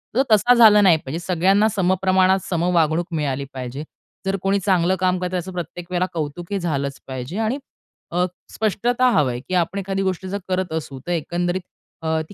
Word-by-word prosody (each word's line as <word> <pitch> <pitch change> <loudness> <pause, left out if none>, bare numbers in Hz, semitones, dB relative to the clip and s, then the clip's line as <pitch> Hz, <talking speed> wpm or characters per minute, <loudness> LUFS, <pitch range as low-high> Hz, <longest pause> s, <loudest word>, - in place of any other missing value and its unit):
तर 260 - +4
तसा 215 +4 +6
झाला 215 -3 +7
नाही 180 -5 +6
पाहिजे. 150 +3 -6
सगळ्यांना 190 +4 +3
समप्रमाणात 190 0 +3
सम 170 -2 0
वागणूक 165 +1 +2
मिळाली 140 -2 -1
पाहिजे, 130 +3 -5 0.4
जर 195 0 0
कोणी 195 +1 +1
चांगलं 185 -1 +2
काम 185 0 +2
करतंय, 180 0 -2
त्याचं 185 +1 -3
प्रत्येक 175 0 -6
वेळेला 180 0 +1
कौतुक 165 +3 -5
हे 200 - 0
झालंच 140 -5 -2
पाहिजे. 130 - -5
आणि 225 +6 0 0.5
अ, 180 +1 +2 0.3
स्पष्टता 240 +4 +1
हवंय, 125 - +1
की 185 +8 -8
आपण 180 +3 0
एखादी 195 0 -2
गोष्ट 190 0 -2
जर 195 +2 -3
करत 185 -2 -1
असू, 140 -4 -4
तर - - -1
एकंदरीत 175 +2 -1 0.4
अ, 160 0 +1
ती - - -11
180 Hz, 185 wpm, -21 LUFS, 160-195 Hz, 0.5 s, झाला